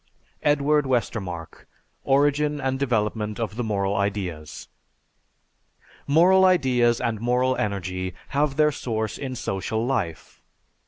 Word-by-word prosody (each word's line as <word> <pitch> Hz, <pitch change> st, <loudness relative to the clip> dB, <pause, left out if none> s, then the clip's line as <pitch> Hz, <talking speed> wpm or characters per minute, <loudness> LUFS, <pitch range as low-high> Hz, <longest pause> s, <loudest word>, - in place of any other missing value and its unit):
(Edward 145 Hz, 0 st, +2 dB
Westermarck: 95 Hz, -9 st, -3 dB, 0.4 s
"Origin 145 Hz, +2 st, +2 dB
and 130 Hz, -1 st, -1 dB
Development 110 Hz, -4 st, -1 dB
of 110 Hz, -3 st, -3 dB
the 120 Hz, -, -2 dB
Moral 100 Hz, -2 st, -1 dB
Ideas.") 95 Hz, -6 st, -3 dB, 1.4 s
Moral 180 Hz, +6 st, +5 dB
ideas 125 Hz, -10 st, +3 dB
and 110 Hz, -2 st, -2 dB
moral 125 Hz, +2 st, +1 dB
energy 95 Hz, -2 st, -3 dB
have 140 Hz, 0 st, 0 dB
their 150 Hz, 0 st, +4 dB
source 110 Hz, -5 st, -3 dB
in 130 Hz, -2 st, -4 dB
social 110 Hz, 0 st, -2 dB
life. 100 Hz, -12 st, -3 dB
120 Hz, 110 wpm, -24 LUFS, 100-140 Hz, 1.4 s, Moral